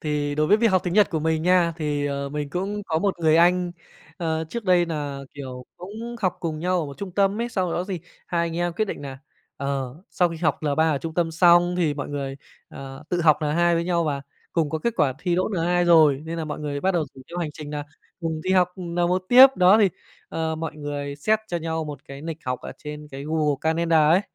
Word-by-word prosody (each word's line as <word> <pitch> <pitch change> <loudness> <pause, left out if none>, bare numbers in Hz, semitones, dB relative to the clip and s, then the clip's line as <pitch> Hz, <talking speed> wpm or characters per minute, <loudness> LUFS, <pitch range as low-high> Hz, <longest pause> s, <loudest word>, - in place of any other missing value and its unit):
thì 150 -1 -1
đối 155 +1 +1
với 205 - +5
việc 230 +1 +2
học 185 -1 +3
tiếng 175 - -2
Nhật 210 0 +5
của 160 - -1
mình 160 0 0
nha, 175 -1 +3
thì, 145 -3 -1
ờ, 140 0 -3
mình 145 0 -4
cũng 200 +4 -3
có 160 - 0
một 190 0 -1
người 160 -1 +4
anh, 175 +1 +3 0.4
ờ, 160 -1 -1
trước 235 +6 -5
đây 180 -2 +4
nà, 145 -4 -4
kiểu, 130 -3 -7
cũng 220 +6 -7
học 185 -4 0
cùng 160 -3 -3
nhau 180 +2 +1
ở 155 - -3
một 140 - -9
trung 195 -2 -6
tâm 200 +3 +1
ấy, 235 - -1
sau 185 -6 -1
đó 175 - -1
gì 185 -3 -4 0.3
hai 170 - 0
anh 165 0 -5
em 175 0 0
quyết 215 +6 0
định 195 - -6
nà, 135 -1 -7 0.4
ờ, 135 -2 -3 0.2
sau 180 -2 +2
khi 165 - -6
học 160 0 0
L3 155 +2 +2
ở 145 - 0
trung 160 +2 -6
tâm 170 -1 +1
xong 175 +1 +5
thì 160 -5 +1
mọi 145 - -5
người, 140 -1 -4 0.3
ờ, 135 0 -9
tự 175 - 0
học 155 -3 +5
N2 170 +3 +2
với 170 0 0
nhau 170 -1 +1
và 140 -3 -2 0.3
cùng 160 -4 +1
có 160 - -1
kết 235 +7 -1
quả 150 -6 +3
thi 175 +1 0
đỗ 185 +1 +1
N2 175 -2 +1
rồi, 155 -5 +5
nên 165 +1 -5
là 160 - -2
mọi 150 - -5
người 145 -1 -3
bắt 190 - +2
đầu 165 -3 +1
rủ 130 - -12
theo 175 - -6
hành 165 -3 -2
trình 150 -1 -8
nà 145 -1 -4 0.4
cùng 160 -2 -2
đi 185 - -2
học, 180 -2 +4
ừm, 180 -2 -6
N1 175 +1 +1
tiếp, 255 +2 +10
đó, 185 +4 +6
thì, 205 -3 +5 0.4
ờ, 160 -1 -2
mọi 160 -1 -5
người 145 -1 -5
set 215 +10 +2
cho 175 - -1
nhau 160 -1 -2
một 145 -3 -7
cái 140 +1 -9
lịch 165 -1 -5
học 125 0 -2
ở - - -7
trên 150 0 -8
cái 135 +1 -7
Google 155 -1 +1
Calendar 160 -1 +3
ấy, 175 +3 +5
165 Hz, 255 wpm, -24 LUFS, 150-180 Hz, 0.4 s, tiếp